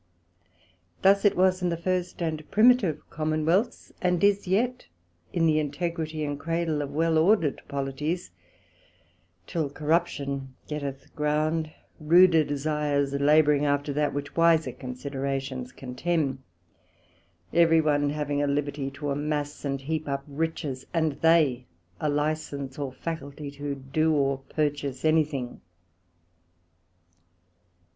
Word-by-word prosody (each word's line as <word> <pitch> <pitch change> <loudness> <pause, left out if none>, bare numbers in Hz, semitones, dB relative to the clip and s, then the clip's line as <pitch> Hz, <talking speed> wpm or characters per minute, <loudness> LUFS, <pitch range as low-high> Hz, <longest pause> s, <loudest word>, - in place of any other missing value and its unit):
Thus 200 +2 +5
it 205 - +4
was 185 0 +3
in 180 - +1
the 170 - -1
first 180 0 -2
and 155 -2 -3
primitive 215 - +4
Commonwealths, 155 +8 0
and 180 -1 +1
is 200 -1 +3
yet 240 +7 0 0.4
in 165 -2 +1
the 155 -1 +3
integrity 155 +1 -3
and 145 -1 -3
Cradle 165 -2 -1
of 145 - -4
well 160 +2 +2
order'd 165 -4 +3
Polities, 140 - -3 1.1
till 160 -4 -2
corruption 140 -3 -1
getteth 140 -3 -6
ground, 155 +1 0 0.3
ruder 165 +1 +6
desires 145 -1 -1
labouring 145 +1 +4
after 145 0 0
that 150 +1 +1
which 145 0 -5
wiser 165 -1 +4
considerations 135 0 -4
contemn; 135 +2 -2 1.1
every 165 -1 +5
one 145 -2 +2
having 145 -1 -1
a 145 - +1
liberty 140 -1 -1
to 140 +1 -4
amass 145 0 -2
and 135 -1 -2
heap 155 +1 -3
up 140 0 -2
riches, 145 -3 -3
and 160 -2 +2
they 150 -7 +3 0.3
a 150 - 0
licence 145 -2 -2
or 140 -2 -3
faculty 145 -1 -6
to 145 0 -4
do 150 +4 0
or 140 -2 +1
purchase 145 -3 -2
any 155 0 +5
thing. 135 -5 -6
150 Hz, 120 wpm, -27 LUFS, 140-165 Hz, 1.1 s, ruder